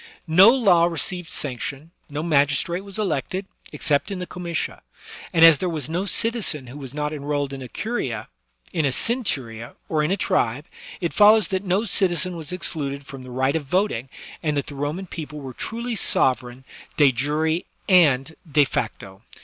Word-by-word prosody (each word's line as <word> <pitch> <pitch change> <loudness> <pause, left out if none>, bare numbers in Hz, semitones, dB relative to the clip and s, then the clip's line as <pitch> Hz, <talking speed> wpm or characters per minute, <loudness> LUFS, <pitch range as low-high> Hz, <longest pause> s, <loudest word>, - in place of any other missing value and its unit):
No 180 +6 +8
law 200 -10 +5
received 175 +1 -2
sanction, 140 +3 -5 0.2
no 150 +1 -3
magistrate 155 +3 +2
was 200 0 -10
elected, 190 0 -2 0.3
ex - - -8
cept 145 0 +2
in 200 - -4
the 180 - -4
comitia 175 -2 -4 0.3
\ - - -13
and 165 -1 +7
as 165 -3 +8
there 185 - -1
was 155 -5 -3
no 175 +4 -1
citizen 210 - -1
who 125 +3 -10
was 135 -3 -8
not 150 +1 -3
enrolled 145 -1 -2
in 135 - -6
a 130 - -6
curia^ 130 - -3 0.5
in 160 - +1
a 140 - +3
centuria^ 130 - -1
or 155 -1 +1
in 150 - +1
a 195 - +1
tribe, 130 - 0 0.4
it 170 - -1
follows 210 -2 +6
that 190 0 -1
no 195 +3 +1
citizen 185 -3 0
was 160 -2 -7
excluded 140 -6 -3
from 135 -1 -9
the 130 - -10
right 130 +3 0
of 155 -3 -1
voting, 140 - 0 0.3
and 150 -3 0
that 140 - -1
the - - -8
Roman 145 +7 -3
people 155 -4 -7
were 135 -3 -7
truly 235 - -4
sovereign 130 - +1 0.3
de 145 -3 +6
jure 150 +6 0 0.3
and 160 -6 +4 0.2
de 145 0 +5
facto. 100 -6 -4
155 Hz, 180 wpm, -23 LUFS, 140-185 Hz, 0.5 s, No